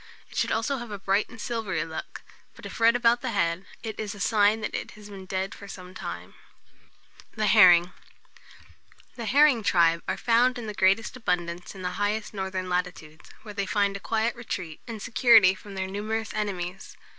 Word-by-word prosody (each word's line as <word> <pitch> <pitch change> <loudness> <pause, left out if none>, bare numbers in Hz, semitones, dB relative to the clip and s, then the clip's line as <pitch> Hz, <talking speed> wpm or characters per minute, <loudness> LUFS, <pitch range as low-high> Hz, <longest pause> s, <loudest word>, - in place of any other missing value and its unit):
It - - -13
should - - 0
also 250 +5 0
have 240 -2 -7
a 205 - -5
bright 195 +2 0
and 250 - -13
silvery 210 -8 -2
look; 160 -1 -8 0.3
but - - -13
if - - -8
red 230 +1 +5
about 240 0 +3
the - - -3
head, 170 +3 0 0.2
it 220 -2 -6
is 210 -1 -4
a - - -11
sign 210 +2 +3
that 215 - -4
it - - -5
has 210 -1 -12
been 190 -1 -10
dead 190 0 -3
for 200 - -11
some 185 -2 -10
time. - - -7
[Illustration: - - -27
THE 215 - +1
HERRING.] 185 -5 +7
THE - - -10
HERRING. - - -26 1.2
The 235 - -5
herring 275 -2 +4
tribe 170 -3 +3
are - - -1
found 245 +2 +3
in 240 - -6
the 210 - -5
greatest 195 +5 +2
abundance 175 -5 -3
in 190 - -9
the 180 +1 -4
highest 210 +2 -1
northern 190 -2 -3
latitudes, 180 -4 -4
where 210 -2 -9
they 200 -1 -2
find 200 0 +1
a - - -5
quiet 225 +3 -1
retreat, 185 -9 -6
and 225 -2 -6
security 225 -3 +5
from 200 +1 -11
their 190 0 -2
numerous 215 +3 -3
enemies. 195 -3 -4
205 Hz, 205 wpm, -26 LUFS, 185-225 Hz, 1.2 s, HERRING